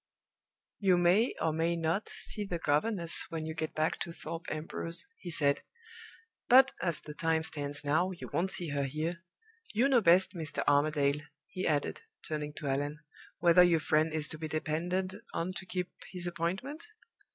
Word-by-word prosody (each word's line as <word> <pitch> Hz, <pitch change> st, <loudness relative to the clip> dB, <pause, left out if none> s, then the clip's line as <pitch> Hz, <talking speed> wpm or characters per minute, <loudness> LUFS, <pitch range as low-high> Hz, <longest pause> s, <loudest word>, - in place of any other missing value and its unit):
"You 190 Hz, -3 st, +4 dB
may, 180 Hz, +7 st, +3 dB
or 160 Hz, -, +1 dB
may 165 Hz, +2 st, +1 dB
not, 165 Hz, +5 st, -1 dB
see 210 Hz, -, -3 dB
the 180 Hz, -4 st, -3 dB
governess 170 Hz, +3 st, +1 dB
when 160 Hz, -2 st, -4 dB
you 160 Hz, -, -4 dB
get 155 Hz, 0 st, -4 dB
back 155 Hz, +1 st, 0 dB
to 170 Hz, -, -4 dB
Thorpe 165 Hz, +1 st, -7 dB
Ambrose," 165 Hz, +2 st, -2 dB
he 180 Hz, -, -7 dB
said; 145 Hz, -4 st, +2 dB, 0.9 s
"but, 265 Hz, +1 st, +8 dB
as 170 Hz, -3 st, +1 dB
the 150 Hz, -, -9 dB
time 160 Hz, +1 st, 0 dB
stands 145 Hz, -1 st, -1 dB
now, 155 Hz, +6 st, +2 dB
you 180 Hz, -2 st, -7 dB
won't 170 Hz, +6 st, +1 dB
see 175 Hz, -3 st, -1 dB
her 140 Hz, -1 st, -1 dB
here. 160 Hz, +5 st, -3 dB, 0.5 s
You 240 Hz, +5 st, +4 dB
know 260 Hz, -4 st, +4 dB
best, 185 Hz, +1 st, +5 dB
Mr. 160 Hz, -4 st, -3 dB
Armadale," 145 Hz, 0 st, +3 dB, 0.2 s
he 185 Hz, 0 st, -4 dB
added, 145 Hz, -, 0 dB, 0.3 s
turning 150 Hz, -1 st, -3 dB
to 150 Hz, -, -6 dB
Allan, 145 Hz, +2 st, -1 dB, 0.4 s
"whether 175 Hz, +1 st, +6 dB
your 175 Hz, -2 st, +5 dB
friend 155 Hz, +1 st, +2 dB
is 155 Hz, -1 st, 0 dB
to 155 Hz, -, -1 dB
be 160 Hz, -, -3 dB
depended 175 Hz, +5 st, -2 dB, 0.2 s
on 175 Hz, +3 st, -1 dB
to 185 Hz, -, -7 dB
keep 180 Hz, -1 st, -3 dB, 0.2 s
his 180 Hz, -2 st, -4 dB
appointment?" 190 Hz, -, -3 dB
165 Hz, 175 wpm, -31 LUFS, 155-180 Hz, 0.9 s, but